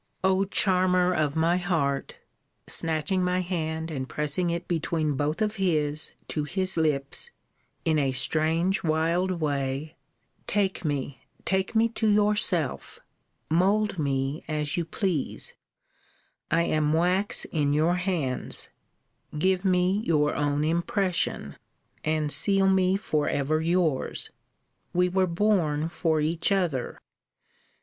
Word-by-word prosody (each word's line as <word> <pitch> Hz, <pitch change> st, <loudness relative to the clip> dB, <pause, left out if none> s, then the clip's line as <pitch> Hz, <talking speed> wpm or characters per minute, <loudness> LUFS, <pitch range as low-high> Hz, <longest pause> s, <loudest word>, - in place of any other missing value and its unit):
O 190 Hz, +1 st, +3 dB
charmer 185 Hz, -2 st, +2 dB
of 150 Hz, -3 st, 0 dB
my 165 Hz, +2 st, +2 dB
heart! 160 Hz, -7 st, -1 dB, 0.5 s
snatching 165 Hz, +4 st, 0 dB
my 180 Hz, 0 st, +1 dB
hand, 160 Hz, -2 st, -3 dB
and 130 Hz, -3 st, -4 dB
pressing 150 Hz, +4 st, -1 dB
it 170 Hz, 0 st, -3 dB
between 160 Hz, -2 st, -1 dB
both 150 Hz, +8 st, -1 dB
of 215 Hz, 0 st, -2 dB
his, 155 Hz, -5 st, 0 dB, 0.2 s
to 150 Hz, -, -1 dB
his 185 Hz, +4 st, 0 dB
lips, 150 Hz, -4 st, 0 dB, 0.6 s
in 155 Hz, -2 st, +2 dB
a 135 Hz, -2 st, +1 dB
strange 160 Hz, +7 st, +1 dB
wild 165 Hz, +3 st, +1 dB
way, 145 Hz, -1 st, -2 dB, 0.5 s
take 195 Hz, -3 st, 0 dB
me, 140 Hz, -3 st, -3 dB, 0.2 s
take 190 Hz, +3 st, -1 dB
me 225 Hz, +1 st, +4 dB
to 220 Hz, -1 st, 0 dB
yourself: 205 Hz, -8 st, +1 dB, 0.5 s
mould 195 Hz, +4 st, +2 dB
me 140 Hz, 0 st, -1 dB
as 150 Hz, -2 st, -1 dB
you 170 Hz, -, -1 dB
please: 175 Hz, -4 st, -2 dB, 1.0 s
I 165 Hz, +1 st, +3 dB
am 155 Hz, -2 st, +1 dB
wax 180 Hz, +5 st, +2 dB
in 145 Hz, -3 st, +1 dB
your 160 Hz, +4 st, +2 dB
hands; 170 Hz, -9 st, -3 dB, 0.7 s
give 185 Hz, +3 st, +1 dB
me 185 Hz, +1 st, +2 dB
your 150 Hz, -5 st, +2 dB
own 145 Hz, 0 st, 0 dB
impression; 175 Hz, +3 st, -1 dB, 0.5 s
and 155 Hz, -1 st, 0 dB
seal 195 Hz, +7 st, +3 dB
me 190 Hz, 0 st, +3 dB
for 155 Hz, -7 st, -1 dB
ever 145 Hz, +3 st, 0 dB
yours 165 Hz, -4 st, 0 dB, 0.6 s
we 180 Hz, +1 st, +2 dB
were 185 Hz, +1 st, +2 dB
born 170 Hz, -5 st, +1 dB
for 160 Hz, -2 st, 0 dB
each 160 Hz, +4 st, 0 dB
other! 175 Hz, -10 st, -1 dB
165 Hz, 125 wpm, -26 LUFS, 150-185 Hz, 1.0 s, me